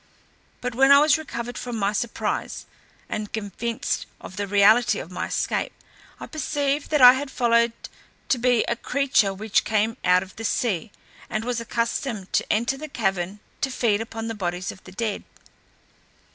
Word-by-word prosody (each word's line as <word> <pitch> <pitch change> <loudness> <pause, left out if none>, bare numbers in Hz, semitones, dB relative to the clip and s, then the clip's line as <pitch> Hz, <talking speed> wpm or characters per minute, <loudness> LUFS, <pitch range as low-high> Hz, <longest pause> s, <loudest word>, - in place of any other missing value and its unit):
But 250 -1 -3
when 270 +3 +5
I 280 - +10
was 295 +1 +5
recovered 245 -5 -5
from 245 -1 -5
my 200 0 0
surprise, 235 +2 -3 0.4
and 210 -1 -4
convinced 220 +2 -3
of 185 - -10
the 200 +1 -3
reality 205 +4 +5
of 170 - -7
my 180 - -3
escape, - - -1 0.5
I - - -6
perceived 290 -1 -2
what 300 -2 +3
I 250 0 +11
had 270 +1 -3
followed 235 -2 +3 0.6
to 260 - +2
be 245 -1 +3
a 235 - -1
creature 255 -5 +1
which 205 +2 0
came 220 +1 0
out 180 0 +4
of 190 - -14
the 225 - -6
sea, 215 -3 -1 0.4
and 215 +1 -2
was 245 -1 -1
accustomed 230 -3 -3
to - - +1
enter 235 +5 +1
the 310 +2 -7
cavern 195 -4 -2 0.2
and 270 - 0
feed 220 -3 +2
upon 225 0 -5
the 225 - -3
bodies 180 -2 -3
of 190 - -15
the 185 - -11
dead. 215 +1 -3
230 Hz, 175 wpm, -24 LUFS, 205-250 Hz, 0.6 s, I